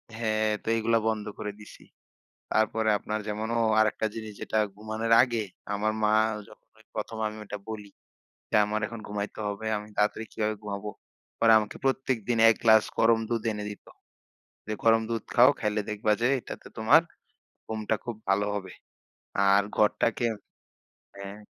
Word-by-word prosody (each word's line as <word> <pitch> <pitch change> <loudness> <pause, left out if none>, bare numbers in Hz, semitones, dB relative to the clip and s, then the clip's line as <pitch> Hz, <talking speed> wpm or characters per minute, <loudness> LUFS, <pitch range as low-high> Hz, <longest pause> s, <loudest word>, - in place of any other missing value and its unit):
হ্যাঁ, 110 -1 0
তো - - -18
এগুলা 115 +1 +2
বন্ধ 110 -2 -1
করে 105 -1 -4
দিসি। 105 - -13 0.7
তারপরে 110 0 +1
আপনার 110 +2 -3
যেমন, 105 +1 -3
ও! - - +2 0.2
আরেকটা 110 0 +2
জিনিস 110 -1 -6
যেটা 110 - -1 0.2
ঘুমানোর 110 +2 -2
আগে, 120 -3 0 0.3
আমার 105 +1 0
মা 105 0 +3 0.4
যখন - - -18
ওই 110 - -21
১ম 110 +1 -4
আমি 105 0 -4
ওটা 105 0 -6
বলি 105 -2 -6 0.6
যে, - - -1
"আমার 105 +1 -1
এখন 115 +1 -8
ঘুমাইতে 105 +1 -4
হবে, 105 +2 -4
আমি 105 - -8
তাড়াতাড়ি 105 +2 +1
কীভাবে 110 -1 -1
ঘুমাব?" 100 0 -5 0.5
পরে 115 -1 +5
আমাকে 105 -1 -5
প্রত্যেকদিন 125 -3 0
এক 115 - +4
গ্লাস 110 -2 +7
গরম 115 0 +4
দুধ 115 -2 -1
এনে 105 -1 -4
দিত। 105 - -10 0.8
যে, 110 - -3
"গরম 115 0 +5
দুধ 115 -2 -1
খাও, 120 +1 +8
খাইলে 105 0 0
দেখবা 105 0 +1
যে 120 - +3
এটাতে - - -9
তোমার 110 +9 +6 0.6
ঘুমটা 110 0 -1
খুব 120 -2 -5
ভালো 100 +1 +2
হবে।" 100 -2 -5 0.8
আর 100 - +4
ঘরটাকে 115 +2 +2 0.9
হ্যাঁ। 100 +1 -8
110 Hz, 160 wpm, -27 LUFS, 105-115 Hz, 0.9 s, খাও